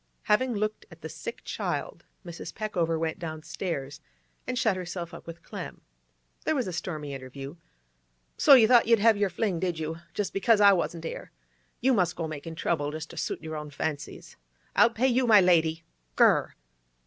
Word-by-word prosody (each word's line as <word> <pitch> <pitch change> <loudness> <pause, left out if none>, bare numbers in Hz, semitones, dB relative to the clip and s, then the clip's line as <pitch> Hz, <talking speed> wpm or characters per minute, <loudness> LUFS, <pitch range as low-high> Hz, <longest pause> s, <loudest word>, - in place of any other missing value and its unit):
Having 240 +3 +2
looked 215 +1 -3
at - - -15
the - - -6
sick 470 - -7
child, - - -4 0.2
Mrs. 170 -2 -7
Peckover 175 -7 -1
went 160 0 -2
downstairs 155 -3 -5 0.5
and 255 - -2
shut 220 -6 +2
herself 175 -1 -6
up 170 - -11
with 165 0 -9
Clem. - - -8 0.6
There 315 - +1
was 260 - 0
a 185 - -5
stormy 155 -4 -4
interview. 135 +3 -8 0.8
'So 280 - +7
you 230 -4 +6
thought 240 -1 +5
you'd 230 0 +6
have 225 +1 +5
yer 205 -1 +1
fling, 185 -1 -1
did 175 -2 -1
you, 160 +1 -4 0.2
just 205 - -2
because 215 +2 +3
I 200 -1 +7
wasn't 170 -2 -2
'ere? - - -6 0.5
You 260 +2 +4
must 180 -6 +1
go 165 -1 -3
makin' 155 +1 -7
trouble, 155 -3 -1
just 155 +1 -6
to - - -12
suit - - -3
yer 160 0 -5
own 150 -1 -6
fancies! 145 0 -5 0.4
I'll 240 - +6
pay 235 +2 -1
you, 250 0 +2
my 215 -3 +8
lady! 165 -3 +3 0.3
Gr - - +5
r - - +8
r! - - -4
175 Hz, 190 wpm, -27 LUFS, 160-215 Hz, 0.8 s, my